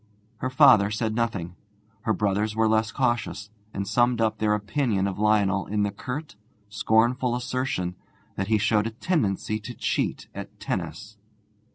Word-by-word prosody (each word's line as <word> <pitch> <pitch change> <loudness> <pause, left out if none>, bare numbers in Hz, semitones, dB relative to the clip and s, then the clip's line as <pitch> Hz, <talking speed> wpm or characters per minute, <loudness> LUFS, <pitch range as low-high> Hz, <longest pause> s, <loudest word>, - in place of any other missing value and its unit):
Her 130 - -2
father 130 -7 +6
said 110 0 -1
nothing. 100 -7 -2 0.5
Her 110 - +2
brothers 105 +1 0
were 110 0 +3
less 110 +1 +2
cautious, 120 -5 -1 0.2
and 100 -1 -4
summed 120 +3 +2
up 110 -1 +1
their 105 -1 +2
opinion 105 -1 0
of 100 0 -3
Lionel 105 -2 +2
in 105 0 0
the 100 - 0
curt, 125 +7 -6 0.3
scornful 120 +4 +2
assertion 125 -8 -2 0.4
that 95 - -2
he 110 0 +3
showed 105 +1 +2
a 115 0 -8
tendency 110 - 0
to 120 +3 -8
cheat - - -1
at - - -9
tennis. 110 -1 -4
110 Hz, 155 wpm, -25 LUFS, 100-120 Hz, 0.5 s, father